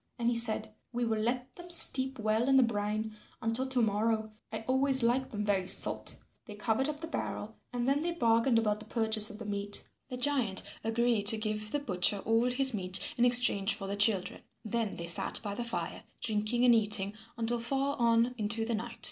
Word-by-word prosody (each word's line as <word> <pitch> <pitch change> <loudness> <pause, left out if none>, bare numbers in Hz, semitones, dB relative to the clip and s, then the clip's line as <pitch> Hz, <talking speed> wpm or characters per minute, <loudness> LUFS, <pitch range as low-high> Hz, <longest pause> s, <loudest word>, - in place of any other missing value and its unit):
And 235 -1 -1
he - - -2
said, 220 -2 -2 0.2
"We 240 0 -3
will 220 -1 -2
let 245 +3 -4
them 350 0 -13
steep 265 -6 +4
well 220 +3 -1
in 270 - +3
the 265 - +5
brine 215 -1 -3 0.2
until 225 +4 -2
to 260 -2 -1
morrow. 220 +1 -1 0.2
I 220 0 -6
always 265 +2 0
like 255 +3 0
them 210 -1 -5
very 195 -3 -1
salt." - - 0 0.3
They 210 - -10
covered 225 +6 -2
up 295 0 -7
the 325 - -6
barrel, 220 -8 -6 0.2
and 245 0 -4
then 280 +2 0
they 340 - -2
bargained 230 -5 +1
about 210 -2 -1
the 215 - -11
purchase 220 -2 +3
of 210 - -8
the 225 - -10
meat. 205 0 -1 0.2
The 250 - -6
giant 250 -7 +1 0.2
agreed 225 -2 0
to 220 - +7
give 215 0 -3
the 290 - -2
butcher 200 -7 +2
all 225 +2 +1
his 265 +1 +6
meat 185 -2 -1
in 240 - +1
exchange 240 -5 +6
for 205 -3 -8
the 200 +1 -4
children. 205 -2 +1 0.2
Then 225 -1 -3
they 170 - -5
sat 170 - +3
by 205 -2 -5
the 240 - -5
fire 175 -8 -5 0.2
drinking 220 +3 -1
and 245 - +5
eating 210 -3 +1 0.2
until 235 +1 -2
far 275 +4 -2
on 235 +1 +1
into 220 +1 -2
the 235 - -3
night. 230 +1 -6
225 Hz, 205 wpm, -29 LUFS, 210-245 Hz, 0.3 s, to